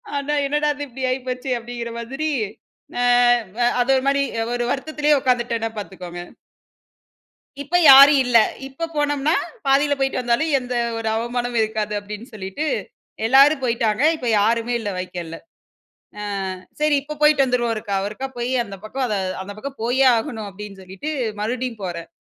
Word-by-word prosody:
ஆனா, 285 +1 -1
"என்னடா 295 +1 +1
இது 290 - -5
இப்டி 260 +1 -8
ஆகிப்போச்சே!" 255 0 -3
அப்டிங்கிற 235 0 -6
மாதிரி 270 +7 -3 0.7
அ - - +2 0.8
அது 245 +2 +1
ஒரு 260 - 0
மாரி 280 0 +3 0.3
ஒரு 240 0 -1
வருத்தத்திலயே 300 +1 +1
உட்காந்துட்டேன்னா 240 -3 0
பாத்துக்கோங்க. 180 -3 -7 1.4
இப்ப 325 +6 0
யாரும் 275 +1 +9
இல்ல. 240 -2 +5 0.3
இப்ப 330 +5 -5
போனம்னா, 290 +2 +1 0.3
பாதியில 285 +1 +3
போய்ட்டு 270 -1 0
வந்தாலும், 245 +6 +1
எந்த 250 -1 -5 0.2
ஒரு 220 -1 -2
அவமானமும் 240 0 -1
இருக்காது 215 -1 -2
அப்டின்னு 210 +5 -9
சொல்லிட்டு 195 +10 -4 0.6
எல்லாரும் 275 +3 +5
போய்ட்டாங்க. 230 -1 0
இப்ப 250 - -7
யாருமே 230 +3 +1
இல்ல 205 -2 -3
வைக்கால்ல. 175 -2 -6 1.2
ஆ - - -7 0.2
சரி 300 -1 +3
இப்ப 300 +1 -7
போய்ட்டு 300 -2 +5
வந்துருவோம் 245 -2 0
ஒருக்கா 205 -2 -3
ஒருக்கா 215 +6 -5
போயி 240 +2 -2
அந்த 200 -2 -9
பக்கம் 260 +4 -3
அத 215 - -2 0.3
"அந்த 205 +1 -8
பக்கம் 275 +5 -8
போயே 255 +3 +2
ஆகணும்." 225 -2 -4
அப்டின்னு 195 0 -10
சொல்லிட்டு 190 +12 -6 0.3
மறுபடியும் 240 0 -3
போறேன். 170 -2 -5
245 Hz, 145 wpm, -21 LUFS, 215-275 Hz, 1.4 s, யாரும்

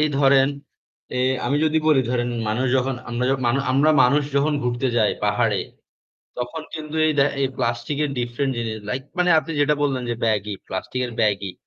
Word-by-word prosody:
এই 155 - +3
ধরেন 135 -1 +5 0.7
এ - - -1 0.3
আমি 140 +4 +1
যদি 155 0 +2
বলি 150 -4 +5
ধরেন 120 -1 0 0.2
মানুষ 125 +5 0
যখন 130 +1 0
আমরা 120 +1 -2
যখ 135 - +1
মান 120 +3 +2 0.2
আমরা 145 +4 +4
মানুষ 140 +4 +4
যখন 145 +2 +2
ঘুরতে 125 +2 -1
যাই 110 -3 +3
পাহাড়ে, - - +1 0.8
তখন 125 +6 -4
কিন্তু 155 -1 -7
এই 155 - +2
দে 140 - +6 0.2
এই 135 - +3
প্লাস্টিক 120 +3 -2
এর 145 - -2
ডিফারেন্ট 120 +3 -2
জিনিস 110 -2 -3
লাইক 125 +5 -2 0.2
মানে 180 0 +3
আপনি 165 +1 -3
যেটা 145 +1 +3
বললেন 135 -3 0
যে - - 0
ব্যাগই, 105 -2 0
প্লাস্টিকের 125 +6 -3
ব্যাগই 100 -3 0
130 Hz, 185 wpm, -22 LUFS, 120-145 Hz, 0.8 s, দে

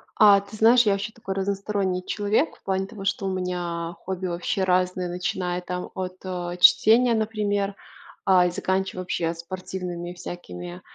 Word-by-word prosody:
А 205 -2 +7
ты 200 +2 -12
знаешь, 235 +3 +6
я 205 - +4
вообще 200 +2 -2
такой 205 -4 -6
разносторонний 195 -1 -1
человек 210 +8 0
в - - -33
плане 190 0 -1
того, 195 0 -9
что 195 0 -1
у 190 - 0
меня 175 -2 -3
хобби 190 0 -3
вообще 175 +3 -1
разные, 180 0 +1
начиная 180 0 -2
там 180 0 -5
от, 185 -1 -4
э, 180 -1 -4
чтения, 230 +5 +6
например, 205 -2 -1 0.5
а, 185 -2 +5
и 175 - +1
заканчивая 190 0 -1
вообще 170 -2 -1
спортивными 175 0 -6
всякими, 90 - -8
185 Hz, 160 wpm, -25 LUFS, 180-200 Hz, 0.5 s, А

